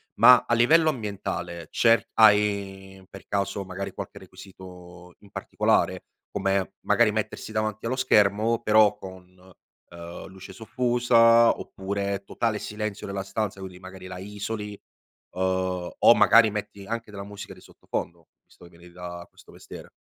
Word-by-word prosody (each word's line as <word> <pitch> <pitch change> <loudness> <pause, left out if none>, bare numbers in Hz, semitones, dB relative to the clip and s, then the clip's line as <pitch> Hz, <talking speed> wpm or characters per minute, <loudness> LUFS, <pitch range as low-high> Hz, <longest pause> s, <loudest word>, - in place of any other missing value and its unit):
ma - - +7
a - - +1
livello 160 +7 +4
ambientale 100 - -5
c'è 115 -2 +3
hai 100 -3 +2
per 95 -1 -13
caso 100 0 -2
magari 95 +1 -6
qualche - - -8
requisito 90 -2 -14
in 100 - -19
particolare? - - 0 0.3
Come 95 -1 -1
magari - - +3
mettersi - - -4
davanti 110 0 -3
allo 130 +3 -1
schermo 110 -2 +2
però 105 -1 +4
con, 95 -1 -11 0.6
uhm, 85 0 -10
luce 95 0 -12
soffusa, 115 +1 +3
oppure 100 0 -4
totale 110 0 -2
silenzio 105 -1 -5
nella 100 0 -4
stanza, 100 0 -4
quindi 95 -1 -9
magari 95 0 -11
la 90 - -8
isoli, 105 +1 -6 0.6
uhm, 95 -1 -1
o - - +7
magari 115 0 +6
metti 105 -1 -6
anche 115 0 -5
della 100 -1 -7
musica 100 0 -10
di - - -17
sottofondo? 85 -1 -7 0.2
Visto - - -21
che 85 - -15
vieni 85 +1 -17
da 85 0 -9
questo - - -19
mestiere. - - -12
100 Hz, 145 wpm, -25 LUFS, 95-110 Hz, 0.6 s, ma